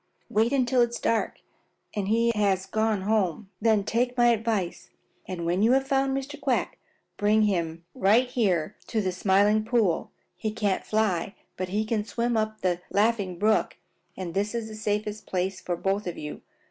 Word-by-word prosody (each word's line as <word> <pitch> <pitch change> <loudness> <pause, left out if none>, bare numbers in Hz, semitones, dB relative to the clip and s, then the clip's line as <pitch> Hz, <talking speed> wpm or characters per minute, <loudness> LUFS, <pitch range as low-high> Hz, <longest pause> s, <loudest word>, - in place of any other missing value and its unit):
Wait 220 +3 +2
until 260 -2 +3
it 240 - +3
is 235 - -6
dark 225 -1 0 0.5
and 200 -2 -1
he 230 +2 +3
has 195 -3 +1
gone 215 0 0
home. 200 -2 0
Then 215 -2 +3
take 245 +4 0
my 240 0 +5
advice, 220 -5 -1 0.4
and 180 -3 -4
when 175 +3 +1
you 230 +4 +5
have 270 0 +3
found 270 0 +1
Mr. 290 +2 -6
Quack, 270 -3 0 0.4
bring 215 +1 +3
him 170 -5 -1
right 210 +6 +4
up - - -14
here 195 -6 +1
to 225 - -1
the 190 -3 0
Smiling 205 +3 +3
Pool. 220 -7 +1 0.3
He 215 - -3
can't 210 -3 -1
fly, 210 -3 0 0.2
but 185 0 -4
he 210 +3 0
can 215 -1 0
swim 235 +2 -1
up 215 0 -1
the 180 -1 0
Laughing 205 -4 +1
Brook, 215 +4 +1 0.4
and 180 -3 -5
this 205 +4 -1
is 225 -1 -3
the 215 - -8
safest 210 0 -3
place 190 +1 -2
for 175 - -2
both 195 +3 -1
of 175 - -4
you. 150 0 -7
210 Hz, 185 wpm, -26 LUFS, 190-230 Hz, 0.5 s, my